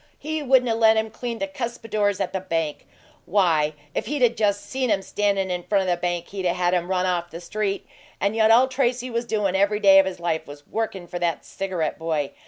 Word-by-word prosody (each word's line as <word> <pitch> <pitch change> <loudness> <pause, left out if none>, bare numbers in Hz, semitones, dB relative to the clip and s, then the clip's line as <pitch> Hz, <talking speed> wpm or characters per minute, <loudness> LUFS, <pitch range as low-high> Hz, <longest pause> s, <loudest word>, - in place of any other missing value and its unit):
He 315 0 -3
wouldn't 260 -2 +4
'a' 230 - +2
let 225 -1 +4
him 220 0 0
clean 235 +1 -5
the 295 - -1
cuspidors 225 -7 -2
at - - -2
the 190 - -1
bank! 165 -5 -3 0.4
Why, 165 -6 +2 0.2
if - - -2
he'd 290 -3 -1
'a' 245 - +7
just 205 -3 0
seen 260 +1 -1
him 195 -2 +1
standin' 200 -2 0
in 180 -1 -2
FRONT 195 +1 +1
the 180 -1 +2
bank 175 0 -3
he'd 195 -1 -5
'a' 175 - +2
had 180 0 +1
him 175 0 0
run 185 -1 +1
off 175 -2 -1
the 165 - -8
street. 200 +3 -3 0.3
And 200 +2 0
yet 220 -1 +4
all 240 +4 +6
Tracy 255 -1 -1
was 235 +1 -1
doin' 205 -4 0
every 200 +2 +2
day 195 -2 +7
of 190 - +4
his 190 - -5
life 170 -2 -2
was 145 0 -11
workin' 215 -5 -3
for 175 0 -6
that 170 -1 -1
cigarette 185 -6 -3
boy! 155 -3 -1
200 Hz, 230 wpm, -24 LUFS, 175-225 Hz, 0.4 s, a